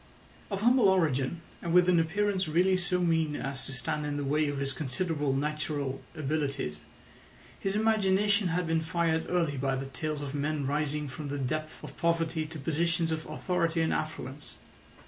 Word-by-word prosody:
Of 200 -2 -2
humble 240 -2 +5
origin, 160 -4 +1 0.2
and 170 - -2
with 180 0 +6
an 180 -2 +5
appearance 190 +3 +1
really 180 +4 +3
so 180 0 0
mean 160 -3 +2
as 135 -1 -4
to - - -7
stand 140 +3 -3
in 145 -1 -2
the 145 - -2
way 150 +2 +2
of 145 - -3
his 135 -1 -1
considerable 150 +1 -1
natural 145 -2 -2
abilities, 140 - -2 0.8
his 195 +1 -1
imagination 205 -2 +3
had 175 +1 0
been 165 0 +1
fired 160 0 0
early 165 -5 +1
by 135 0 0
the 135 +1 -3
tales 145 +3 -4
of 140 -1 -5
men 145 0 -1
rising 150 +1 -1
from 145 +2 -6
the 145 +1 -3
depths 155 +4 -3
of - - -8
poverty 165 -1 +1
to 160 - -8
positions 165 +3 0
of 160 0 -3
authority 170 -3 0
and 160 - +2
affluence. 145 -2 -4
155 Hz, 175 wpm, -30 LUFS, 145-175 Hz, 0.8 s, with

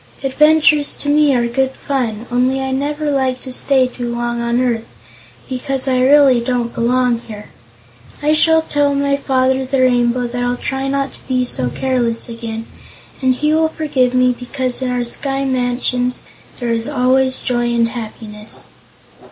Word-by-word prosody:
Adventures 300 +1 +3
to 290 - -3
me 295 -2 +4
are 240 -1 +1
good 265 +3 0
fun, 240 -6 -3
only 255 +2 +1
I 265 0 -2
never 295 +3 -1
like 260 -2 0
to 260 - -7
stay 265 0 +3
too 245 -1 -5
long 240 0 -2
on 235 +1 0
earth, 235 -3 -1 0.6
because 260 +1 -2
I 255 -1 +2
really 270 -2 +5
don't 240 -1 -2
belong 245 0 +1
here. 210 -3 -10 0.7
I 300 +1 +2
shall 320 +1 +4
tell 290 -2 +1
my 280 0 +1
Father 265 -1 +1
the 265 0 0
Rainbow 245 -1 +2
that 245 +1 -3
I'll 245 0 -1
try 270 +2 -3
not 275 0 -1
to - - -14
be 255 -1 +1
so 125 - 0
careless 240 - -1
again, 230 -1 -6 0.6
and 260 -1 +2
he 300 +3 +1
will 320 0 +2
forgive 285 -6 0
me 255 0 +4
because 255 +1 -3
in 260 - -1
our 250 -1 -1
sky 270 +3 -2
mansions 250 -1 -1 0.4
there 240 -2 -2
is 230 0 -2
always 260 -1 +2
joy 240 -1 -1
and 235 -1 +2
happiness." 215 -2 -8
255 Hz, 170 wpm, -17 LUFS, 240-275 Hz, 0.7 s, really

